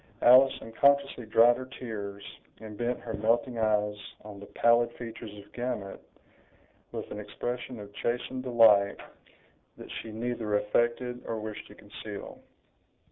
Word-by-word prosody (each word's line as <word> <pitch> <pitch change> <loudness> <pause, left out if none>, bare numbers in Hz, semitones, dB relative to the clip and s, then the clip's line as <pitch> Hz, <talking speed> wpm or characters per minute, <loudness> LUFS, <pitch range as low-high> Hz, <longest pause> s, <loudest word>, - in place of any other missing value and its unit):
Alice 130 +2 +7
unconsciously 140 +1 +2
dried 120 +2 +6
her 130 0 -7
tears, 100 -4 -6 0.4
and 110 -1 -9
bent 120 +2 -2
her 115 - -6
melting 115 +3 +1
eyes 105 -1 +1 0.3
on 105 -1 -10
the 100 - -10
pallid 120 0 +3
features 115 -1 -7
of 100 0 -14
Gamut, 120 -5 -4 0.9
with - - -6
an 105 - -5
expression 120 +3 -5
of 100 0 -10
chastened 125 +3 -2
delight 110 -5 +5 0.8
that - - -10
she 110 - -9
neither 110 -1 -2
affected 120 +4 0
or 115 -1 -2
wished 110 -1 -7
to - - -14
conceal. - - -9
115 Hz, 135 wpm, -29 LUFS, 105-125 Hz, 0.9 s, Alice